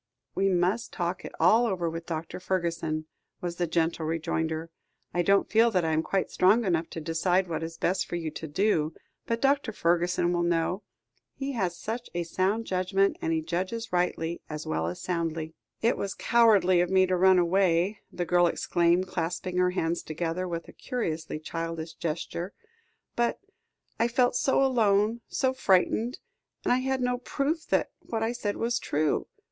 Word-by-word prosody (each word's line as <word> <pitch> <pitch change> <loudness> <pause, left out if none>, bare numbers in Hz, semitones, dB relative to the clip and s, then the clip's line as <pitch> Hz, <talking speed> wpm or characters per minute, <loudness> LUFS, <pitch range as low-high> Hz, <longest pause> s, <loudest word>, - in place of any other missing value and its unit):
"We 195 0 +2
must 185 +6 +1
talk 175 +1 -3
it - - -6
all 220 +9 +5
over 180 -5 -1
with 165 +1 -5
Dr. 165 0 -4
Fergusson," 170 -4 -2 0.3
was 175 -1 -4
the 175 - 0
gentle 165 0 0
rejoinder. 160 0 -2 0.4
"I 175 - +2
don't 200 +3 +3
feel 225 +2 +4
that 180 -6 +1
I 160 - +1
am 160 0 +2
quite 190 +3 -1
strong 210 +6 +4
enough 170 -3 0
to - - -6
decide 175 +4 +1
what 165 -1 -3
is 165 0 -5
best 185 +3 0
for - - -4
you 165 -2 -3
to 160 - -6
do, 155 -1 +1 0.3
but 230 0 0
Dr. 275 -3 +2
Fergusson 175 -1 +1
will 175 - +1
know. 170 +3 0 0.5
He 275 0 -3
has 185 -9 -1
such 230 +6 -5
a 175 - 0
sound 190 +6 0
judgment, 195 +1 +1
and 160 - -1
he 160 -1 0
judges 185 +7 -3
rightly, 170 -1 0
as 150 0 -5
well 80 +1 -1
as 85 - -4
soundly." 165 -2 -2 0.3
"It 230 - +3
was 200 -1 -3
cowardly 205 -7 +4
of 175 - 0
me 190 0 +5
to 185 0 +1
run 185 +1 +5
away," 180 +2 +2
the 175 - -3
girl 175 +1 +4
exclaimed, 175 +2 +2
clasping 175 +1 -3
her 180 0 +4
hands 170 -2 -1
together 165 +3 -3
with 170 -1 -4
a - - -12
curiously 165 - -3
childish 165 +1 -5
gesture; 170 +3 -4 0.6
"but 240 0 +1 0.6
I 230 - +4
felt 245 +1 +2
so 270 +1 +3
alone 225 -3 +2
so 260 -1 0
frightened 225 +2 +2 0.5
and - - +4
I 250 - +2
had 265 0 -1
no 250 0 0
proof 295 +5 -2
that - - +1
what 225 -1 -3
I 225 - +1
said 220 -4 -3
was 235 +1 0
true. 150 0 0
180 Hz, 180 wpm, -28 LUFS, 165-215 Hz, 0.6 s, all